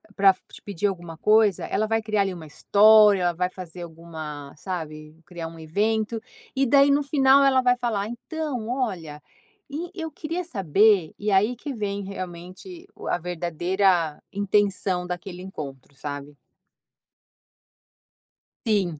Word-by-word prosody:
pra 195 -1 +6 0.2
te - - -11
pedir 205 0 -2
alguma 175 -4 -5
coisa, 210 -1 +3
ela 215 +1 0
vai 225 0 +1
criar 215 -2 0
ali 195 -1 0
uma 165 -3 -9
história, 210 +4 +6
ela 175 -1 +2
vai 180 +2 -1
fazer 180 -2 -9
alguma 160 -4 -8
sabe, 155 -4 -6
criar 175 -4 -6
um 165 0 -11
evento. 215 +7 0 0.4
E 270 0 +2
daí 280 +2 +5
no 290 +1 +3
final 275 -1 +5
ela 265 -1 +4
vai 250 0 +3
falar: 220 -4 -1
"Então 255 -1 -4
olha, 180 - -3 0.7
eu 320 -3 -5
queria 335 +3 -4
saber", 200 - +3
e 210 0 -1
aí 210 +6 +3
que 280 +4 -6
vem 205 -2 -3
realmente 185 - -8
o - - -10
a - - +1
verdadeira 175 -1 0
intenção 195 -2 +1
daquele 180 0 -6
encontro, 140 -7 -8
sabe? 145 +1 -7 2.3
Sim, 210 -3 +3
195 Hz, 140 wpm, -25 LUFS, 170-220 Hz, 2.3 s, pra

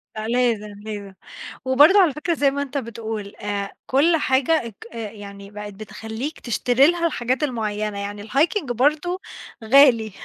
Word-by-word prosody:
لأ، 215 0 -4
لازم 230 -3 0
لازم، 205 -2 -6 0.5
وبرضو 290 +9 +6
على 350 -7 +4
فكرة 305 +4 -1
زي 285 -3 +2
ما 280 +1 -3
أنت 285 0 -4
بتقول، 220 -4 -5
آآ 200 -1 -4
كل 315 +6 +3
حاجة 275 0 +2
أك 220 - -12
آآ 225 -3 -5
يعني 200 -1 -11
بقت 210 0 -8
بتخليك 220 +7 -7
تشتري 245 +3 +3
لها 340 0 +1
الحاجات 255 -3 -1
المعيّنة، 215 -5 -2
يعني 205 0 -5
الhiking 315 - +2
برضو 300 - 0 0.4
غالي، 230 -2 +5
240 Hz, 150 wpm, -22 LUFS, 210-285 Hz, 0.5 s, وبرضو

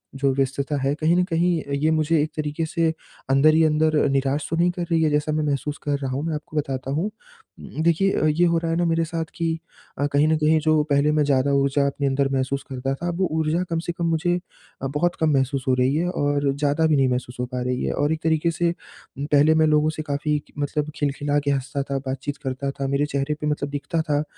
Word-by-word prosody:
जो 135 0 +1
व्यस्तता 135 +2 -1
है 135 +1 +1
कहीं 160 +2 +2
न 180 - +3
कहीं 170 -1 +1
अ, 140 - -10
ये 150 +3 +1
मुझे 155 0 +2
एक 155 +2 -2
तरीके 150 +1 -2
से, 165 0 0 0.4
अंदर 135 +3 +5
ही 160 +1 +4
अंदर 155 0 +2
निराश 140 +1 0
तो 165 - -1
नहीं 170 +2 +3
कर 175 0 -4
रही 165 -1 +3
है? 155 - +3
जैसा 150 +1 0
मैं 155 0 0
महसूस 145 0 -2
कर 145 -1 0
रहा 135 -2 -3
हूँ 135 +3 -2
मैं 165 - -1
आपको 150 +1 -7
बताता 135 -2 -2
हूँ 155 +7 0 0.5
उम, - - -6
देखिए 170 0 +2
ये 160 +3 +3
हो 170 -1 +2
रहा 165 0 -1
है 165 - 0
ना 175 - +1
मेरे 165 0 +1
साथ 165 0 -3
कि 165 -1 -1 0.4
अ, 145 - +2
कहीं 145 +2 +4
न 160 0 +3
कहीं 155 +1 +3
जो 155 0 +3
पहले 140 +2 +3
मैं 150 0 +2
ज़्यादा 140 -1 +2
ऊर्जा 140 0 +2
अपने 140 0 -1
अंदर 135 0 +1
महसूस 135 +1 -1
करता 135 0 -2
था 170 +5 -5
अब 175 0 -3
वो 190 - +2
ऊर्जा 160 +3 +1
कम 165 -1 0
से 170 - -3
कम 170 0 -3
मुझे 165 +2 +1 0.5
अ, 135 - -1
बहुत 155 +6 0
कम 160 - +2
महसूस 135 -1 0
हो 130 - +3
रही 130 +3 +2
है 170 +3 +1
और 145 -4 0
ज़्यादा 145 +2 +1
भी 155 - +3
नहीं 135 -2 +3
महसूस 125 0 -3
हो 125 - 0
पा 125 0 -4
रही 125 0 -2
है - - -1
और 145 +2 +1
एक 160 - -5
तरीके 160 +1 +2
से 170 +1 0 0.5
पहले 145 +2 +3
मैं 160 0 +4
लोगों 150 0 +3
से 155 - -3
काफ़ी 150 0 -1 0.2
मतलब 150 +1 -2
खिलखिला 145 0 0
के 140 - +2
हँसता 140 +1 -2
था, 140 0 -3
बात-चीत 135 +1 -4
करता 135 +1 -3
था, 135 0 -4
मेरे 140 +2 +1
चेहरे 140 0 -1
पे 150 - -1
मतलब 150 -1 -1
दिखता 145 +3 -2
था 150 -2 0
अ, - - 0
150 Hz, 250 wpm, -23 LUFS, 140-160 Hz, 0.5 s, अंदर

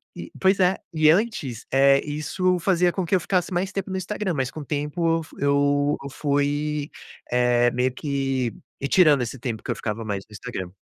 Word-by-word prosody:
e - - -8
pois 190 +1 +3
é, 185 +1 +3 0.2
e 155 -1 +4
antes, 160 - 0
eh, 140 0 +5
isso 175 +5 0
fazia 180 -1 +2
com 190 - -2
que 175 +3 +1
eu 185 - +3
ficasse 180 +1 -1
mais 185 +2 -1
tempo 195 -1 -4
no 190 - -2
Instagram, 190 -1 -3
mas 130 -2 -1
com 155 - -8
o - - -6
tempo 150 +4 -3 0.2
eu 165 - -4
fu - - -16
eu 145 +1 +2
eu 140 - -6
fui 145 +1 -1 0.4
eh, 120 -1 +3
meio 125 +1 +1
que 135 -3 -2 0.3
retirando 145 -2 +4
esse 120 +2 -6
tempo 115 -3 -4
que - - -3
eu - - -1
ficava 110 +1 -4
mais 100 -2 -3
no - - -26
Instagram. 95 -2 -6
145 Hz, 205 wpm, -24 LUFS, 130-180 Hz, 0.4 s, eh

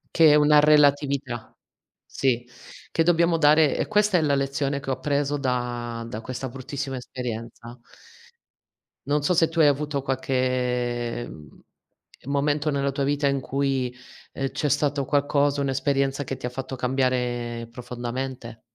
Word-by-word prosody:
Che 160 -2 +7
è 150 - +6
una 150 0 +6
relatività. 145 -4 +2 0.5
Sì. 125 -2 -1 0.4
Che - - +1
dobbiamo 170 0 +3
dare 150 0 +5
e - - -1
questa 210 -3 +3
è - - 0
la 145 -2 +2
lezione 140 0 -1
che 135 -1 -4
ho - - +2
appreso 140 +2 -1
da 120 -3 -3
da 110 -1 -6
questa 130 +2 -5
bruttissima 135 +1 -5
esperienza. 120 -1 -7 1.3
Non 145 +1 0
so 180 - +2
se 165 -1 +3
tu 165 0 +1
hai - - +7
avuto 145 -1 0
qualche, 125 -2 -1
mhmm, 75 -1 -13 0.6
momento 145 +2 0
nella 140 -1 0
tua 140 +1 -2
vita 145 +1 0
in 140 0 +1
cui, 135 -2 -1 0.4
ehm, 135 -1 -3
c'è 150 - -1
stato 145 -1 +1
qualcosa, 145 0 +1
un'esperienza 135 0 0
che 135 0 -5
ti - - -7
ha - - -1
fatta 130 +1 -5
cambiare 125 -2 -1
profondamente? 125 -1 -6
135 Hz, 145 wpm, -25 LUFS, 125-145 Hz, 1.3 s, Che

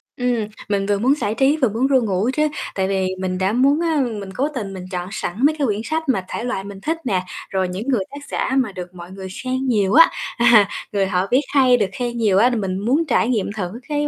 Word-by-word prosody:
Ừm, 245 -4 -1 0.2
mình 200 -1 0
vừa 200 0 +1
muốn 260 +5 +3
giải 215 -7 -2
trí 275 +5 +3
vừa 255 -7 +2
muốn 235 +6 0
ru 265 -2 +3
ngủ 205 +2 0
chứ. 305 +1 +2 0.3
Tại 190 -1 0
vì 190 -1 0
mình 185 -1 -2
đã 190 +3 0
muốn, 275 +5 +3
a, 320 -3 +1
mình 210 -6 -3
cố 275 +7 0
tình 200 -5 -4
mình 185 -1 -7
chọn 180 0 -4
sẵn 215 +4 -2
mấy 310 +1 +3
cái 280 - +2
quyển 210 0 -1
sách 315 +1 -2
mà 190 -7 +1
thể - - -4
loại 245 -6 -2
mình 200 -1 -9
thích 320 +7 -1
nè, 190 -6 0 0.3
rồi 190 -1 0
những 195 +8 -5
người 240 -8 +1
tác 285 - -8
giả - - -1
mà 240 -6 +1
được 180 -1 -8
mọi 175 +1 -10
người 190 0 -8 0.2
khen 260 +1 -2
nhiều 205 -5 +2
á, 330 +3 +7 0.3
à. 235 -4 +6 0.2
Người 200 -2 +1
họ 185 0 0
viết 255 +3 +4
hay, 255 -3 +5
được 210 - +2
khen 240 -1 -3
nhiều 210 -5 +2
á 235 +5 +5
thì 245 - -1
mình 190 -3 -2
muốn 270 +11 +1
trải 240 -4 +2
nghiệm 225 -6 0
thử 180 -4 -3 0.2
cái 295 0 0
220 Hz, 260 wpm, -20 LUFS, 195-260 Hz, 0.3 s, á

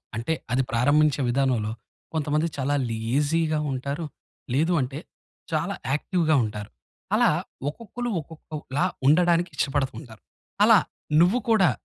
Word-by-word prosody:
అంటే 115 +8 -1 0.2
అది 130 +2 +2
ప్రారంభించే 145 +4 +3
విధానంలో. 120 -4 +1 0.4
కొంతమంది 155 +1 0
చాలా 140 +2 0
లేజీగా 145 +8 0
ఉంటారు. 140 +5 -3 0.5
లేదు 160 +6 +2
అంటే 135 +3 -4 0.5
చాలా 165 +5 -1 0.2
యాక్టివ్‌గా 160 +1 +1
ఉంటారు. 105 -1 -5 0.5
అలా - - +5 0.4
ఒక్కొక్కలు 235 +8 -6
ఒక్కొక్కలా 155 0 -4 0.2
ఉండడానికి 175 +3 +4
ఇష్టపడుతుంటారు. 135 - -2 0.4
అలా - - +7 0.4
నువ్వు 185 +8 +4
కూడా 195 -8 +5
150 Hz, 105 wpm, -25 LUFS, 130-165 Hz, 0.5 s, అలా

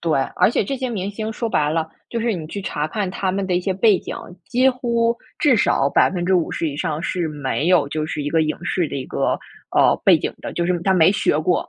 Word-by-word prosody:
对， 160 -4 +1 0.2
而 - - +5
且 230 - +1
这 275 - -3
些 260 0 -3
明 200 -4 -3
星 220 +2 -4
说 230 +1 -3
白 150 -7 +1
了， 160 0 -1 0.2
就 235 - -3
是 230 0 0
你 165 -5 -5
去 200 +5 -6
查 150 -3 -2
看 195 +2 -3
他 190 -1 -2
们 195 0 -2
的 180 - 0
一 - - +1
些 190 +1 -1
背 205 -1 +4
景， - - -7 0.3
几 255 +1 +3
乎 235 -2 0 0.2
至 265 -6 +4
少 140 -8 +2
50% 175 -2 +1
以 140 - -6
上 155 +1 -2
是 180 -2 -1
没 145 +1 -2
有， 180 -5 +4
就 155 +1 -2
是 150 -2 -4
一 145 - -2
个 160 -1 +3
影 155 - -1
视 175 -2 0
的 - - -5
一 130 - -4
个， - - -1 0.4
呃， - - +5
背 - - +7
景 - - -3
的， - - -6
就 170 - -1
是 180 -1 +1
他 190 - +2
没 170 0 +5
学 175 -6 +1
过。 170 +3 0
180 Hz, 260 characters per minute, -21 LUFS, 155-215 Hz, 0.4 s, 背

